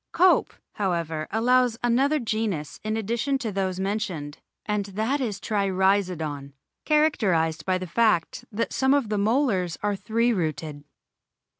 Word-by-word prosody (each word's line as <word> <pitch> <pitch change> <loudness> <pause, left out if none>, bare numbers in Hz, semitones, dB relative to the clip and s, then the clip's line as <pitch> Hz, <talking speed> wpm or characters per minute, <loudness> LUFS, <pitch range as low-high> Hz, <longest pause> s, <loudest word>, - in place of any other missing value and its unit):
Cope, 370 +1 +4 0.2
however, 170 -5 -2
allows 245 +1 +2
another 265 +5 +3
genus 215 - -2
in 215 +1 -1
addition 235 +6 -1
to 235 -5 -4
those 190 -1 -2
mentioned, 190 -7 -3 0.3
and 210 -1 -1
that 220 +8 -1
is 210 -6 -2
Trirhizodon, 185 -9 0 0.3
characterised 185 - +2
by 185 -1 +2
the 185 - -5
fact 215 +2 +1
that 225 +2 -2
some 265 +1 +3
of 270 -7 0
the 210 -1 0
molars 205 - +1
are 205 -1 +1
three 230 +4 +1
rooted. 155 -5 -3
205 Hz, 135 wpm, -25 LUFS, 180-235 Hz, 0.3 s, Cope